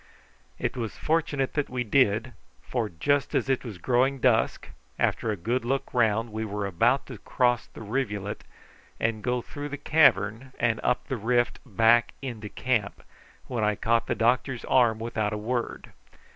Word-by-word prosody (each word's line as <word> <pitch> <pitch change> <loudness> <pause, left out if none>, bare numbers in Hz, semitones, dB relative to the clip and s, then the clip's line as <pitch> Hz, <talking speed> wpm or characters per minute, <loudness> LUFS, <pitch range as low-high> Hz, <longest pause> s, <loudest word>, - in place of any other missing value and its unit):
It - - -2
was 115 -4 -4
fortunate 150 -4 0
that 145 -2 -1
we 125 -1 -2
did, 115 0 +2 0.3
for 120 -4 -2
just 140 - 0
as - - +1
it 135 - +1
was 110 -7 -7
growing 130 +7 +2
dusk, 120 -3 +1 0.3
after 115 - 0
a 105 - -1
good 115 +8 -1
look 135 +3 -2
round 115 -1 +2
we 110 +1 -3
were 105 -1 -3
about 95 -4 +2
to - - -9
cross 120 -1 +1
the - - -11
rivulet, 105 -3 -3 0.6
and 110 -1 0
go 125 +1 -1
through 145 0 -7
the 145 - -5
cavern 135 -5 +3
and 115 -2 +1
up 125 - 0
the 130 - -2
rift 120 +2 +1
back 115 +1 +3
into 115 -6 -6
camp, 115 -5 -1 0.4
when 120 -4 -2
I 105 0 +2
caught 115 +2 +1
the - - 0
doctor's 120 +2 +1
arm 120 -4 +4
without 110 -2 -2
a - - -2
word. 120 +3 -3
120 Hz, 170 wpm, -27 LUFS, 110-130 Hz, 0.6 s, arm